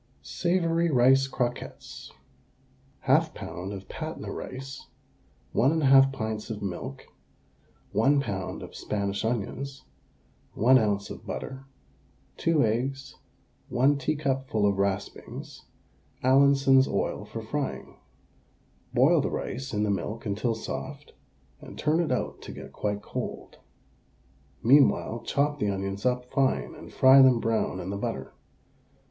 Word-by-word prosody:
SAVOURY 170 Hz, -1 st, +1 dB
RICE 135 Hz, 0 st, +4 dB
CROQUETTES. 125 Hz, -2 st, -5 dB, 0.9 s
1/2 -, -, +3 dB
lb. 90 Hz, +3 st, -6 dB
of 100 Hz, -1 st, -8 dB
Patna -, -, -6 dB
rice, 135 Hz, +1 st, -7 dB, 0.6 s
1 145 Hz, +7 st, +2 dB
1/2 135 Hz, -2 st, +6 dB
pints 110 Hz, -4 st, -4 dB
of 105 Hz, -2 st, -5 dB
milk, 90 Hz, -8 st, -5 dB, 0.9 s
1 135 Hz, +8 st, +3 dB
lb. 95 Hz, -6 st, -4 dB
of -, -, -10 dB
Spanish 100 Hz, -1 st, -2 dB
onions, 125 Hz, +5 st, -3 dB, 0.7 s
1 130 Hz, +4 st, +5 dB
oz. 100 Hz, -2 st, -1 dB
of -, -, -10 dB
butter, 135 Hz, 0 st, -6 dB, 0.7 s
2 160 Hz, -6 st, +2 dB
eggs, 130 Hz, +5 st, -2 dB, 0.6 s
1 140 Hz, +3 st, +3 dB
teacupful 135 Hz, -6 st, 0 dB
of 100 Hz, -1 st, +1 dB
raspings, 100 Hz, 0 st, -4 dB, 0.6 s
Allinson's 135 Hz, 0 st, +5 dB
oil -, -, -2 dB
for -, -, -7 dB
frying. -, -, -4 dB, 1.0 s
Boil -, -, +5 dB
the -, -, -1 dB
rice 130 Hz, +2 st, -4 dB
in 105 Hz, -1 st, 0 dB
the 105 Hz, -, +1 dB
milk 110 Hz, +4 st, -3 dB
until 110 Hz, +3 st, -1 dB
soft, 110 Hz, -, -7 dB, 0.5 s
and -, -, -11 dB
turn 155 Hz, +2 st, +1 dB
it 170 Hz, -6 st, 0 dB
out 125 Hz, -, -2 dB
to -, -, -8 dB
get -, -, -10 dB
quite 105 Hz, -1 st, -3 dB
cold. -, -, -6 dB, 1.0 s
Meanwhile 120 Hz, -3 st, +4 dB
chop 145 Hz, +1 st, +1 dB
the 105 Hz, -, +1 dB
onions 100 Hz, +2 st, -2 dB
up 125 Hz, 0 st, 0 dB
fine 135 Hz, -1 st, +1 dB
and -, -, -12 dB
fry 135 Hz, +1 st, +7 dB
them 130 Hz, -3 st, +6 dB
brown 115 Hz, -4 st, 0 dB
in 95 Hz, +1 st, -5 dB
the 100 Hz, -, -3 dB
butter. -, -, -4 dB
125 Hz, 125 wpm, -27 LUFS, 105-135 Hz, 1.0 s, fry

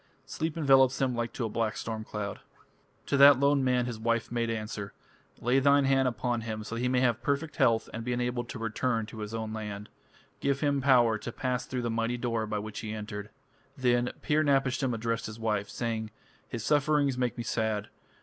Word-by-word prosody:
Sleep 160 Hz, 0 st, -3 dB
envelops 135 Hz, -3 st, +5 dB
him 130 Hz, -2 st, +1 dB
like 120 Hz, 0 st, -2 dB
to 120 Hz, -, -2 dB
a -, -, 0 dB
black 110 Hz, 0 st, -1 dB
storm 110 Hz, -1 st, -4 dB
cloud." 105 Hz, -2 st, -5 dB, 0.7 s
To 140 Hz, -, +1 dB
that 140 Hz, -1 st, +8 dB
lone 140 Hz, 0 st, +3 dB
man 125 Hz, -1 st, +2 dB
his 120 Hz, -3 st, -5 dB
wife 115 Hz, 0 st, 0 dB
made 120 Hz, -1 st, 0 dB
answer: 110 Hz, -3 st, -4 dB, 0.5 s
"Lay 125 Hz, +3 st, +3 dB
thine 140 Hz, +1 st, +4 dB
hand 135 Hz, -1 st, +3 dB
upon 120 Hz, 0 st, -1 dB
him 110 Hz, -1 st, -4 dB
so 110 Hz, -, -7 dB
that 115 Hz, -, -2 dB
he 125 Hz, -, +1 dB
may 125 Hz, 0 st, +2 dB
have 120 Hz, -2 st, +2 dB
perfect 145 Hz, +2 st, -1 dB
health 115 Hz, -1 st, +3 dB
and 115 Hz, -, -4 dB
be 125 Hz, -, -2 dB
enabled 120 Hz, 0 st, -2 dB
to -, -, -6 dB
return 115 Hz, +1 st, -1 dB
to 110 Hz, +1 st, -10 dB
his 105 Hz, +1 st, -5 dB
own 110 Hz, -1 st, -4 dB
land. 105 Hz, -1 st, -6 dB, 0.5 s
Give 140 Hz, 0 st, 0 dB
him 140 Hz, -2 st, +1 dB
power 120 Hz, -5 st, +4 dB
to 120 Hz, -, -6 dB
pass 125 Hz, +1 st, -2 dB
through 125 Hz, -1 st, -3 dB
the 120 Hz, -, -1 dB
mighty 115 Hz, +2 st, -1 dB
door 115 Hz, -2 st, -1 dB
by 105 Hz, 0 st, -2 dB
which 105 Hz, 0 st, -5 dB
he 110 Hz, -1 st, -5 dB
entered." 105 Hz, -1 st, -6 dB, 0.5 s
Then 125 Hz, -1 st, +2 dB
Pir 155 Hz, +1 st, +2 dB
napishtim 135 Hz, -2 st, +2 dB
addressed 115 Hz, 0 st, -2 dB
his 110 Hz, +1 st, -8 dB
wife, 105 Hz, -3 st, -1 dB
saying: 115 Hz, -2 st, -3 dB, 0.4 s
"His 115 Hz, -3 st, -5 dB
sufferings 145 Hz, -2 st, +2 dB
make 125 Hz, -2 st, -1 dB
me 120 Hz, -, -3 dB
sad. 110 Hz, -2 st, -1 dB
120 Hz, 205 wpm, -29 LUFS, 110-130 Hz, 0.7 s, that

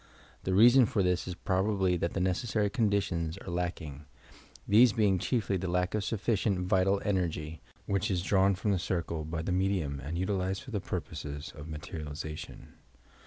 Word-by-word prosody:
The 95 Hz, -, +1 dB
reason 120 Hz, +4 st, +7 dB
for 100 Hz, -, +1 dB
this 90 Hz, 0 st, 0 dB
ia 90 Hz, -, -4 dB
probably 95 Hz, -1 st, +2 dB
that 85 Hz, 0 st, -2 dB
the -, -, -1 dB
necessary 100 Hz, +3 st, 0 dB
conditions 100 Hz, -7 st, 0 dB
are 95 Hz, -, -8 dB
lacking, 85 Hz, -5 st, -4 dB, 0.6 s
these 110 Hz, +2 st, +6 dB
being 100 Hz, -4 st, +2 dB
chiefly 105 Hz, -2 st, 0 dB
the 95 Hz, +1 st, -3 dB
lack 90 Hz, +1 st, 0 dB
of 105 Hz, -2 st, 0 dB
sufficient 105 Hz, -2 st, 0 dB
vital 95 Hz, +2 st, +2 dB
energy, 80 Hz, -5 st, -1 dB, 0.2 s
which 100 Hz, 0 st, 0 dB
is 90 Hz, -3 st, 0 dB
drawn 95 Hz, 0 st, +3 dB
from 105 Hz, +3 st, -1 dB
the 95 Hz, -, +1 dB
circle 85 Hz, -2 st, -2 dB
by 80 Hz, +1 st, -4 dB
the 90 Hz, -, -2 dB
medium 90 Hz, -7 st, 0 dB
and 75 Hz, +4 st, -5 dB
utilized 95 Hz, +2 st, -1 dB
for 130 Hz, -, -10 dB
the 105 Hz, -3 st, -2 dB
purposes 75 Hz, -2 st, -5 dB
of 75 Hz, +1 st, -9 dB
materialization. 75 Hz, -1 st, -7 dB
95 Hz, 165 wpm, -30 LUFS, 85-100 Hz, 0.6 s, reason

